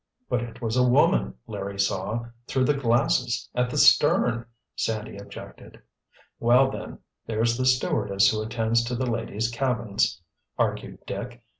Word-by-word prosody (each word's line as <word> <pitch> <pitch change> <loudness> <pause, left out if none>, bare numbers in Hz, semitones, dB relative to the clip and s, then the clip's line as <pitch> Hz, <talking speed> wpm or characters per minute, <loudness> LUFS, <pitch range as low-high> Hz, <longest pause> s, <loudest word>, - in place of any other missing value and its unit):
"But 125 - 0
it 120 0 -8
was 115 0 -1
a 125 - +5
woman 65 - +3
Larry 100 0 -6
saw, 100 +4 -1 0.2
through 130 - +1
the 145 - +3
glasses, 120 -2 +1
at 125 0 0
the - - -4
stern," 120 0 +4 0.3
Sandy 110 -2 -3
objected. 100 0 -11 0.6
"Well, 125 +3 +4
then—there's 115 -2 -3
the 130 +1 0
stewardess 100 -6 +2
who 110 -1 -2
attends 115 +1 0
to 120 +1 -3
the 130 +2 -1
ladies' 115 -1 -2
cabins," 115 -7 0 0.4
argued - - -2
Dick. - - -6
115 Hz, 140 wpm, -25 LUFS, 110-125 Hz, 0.6 s, a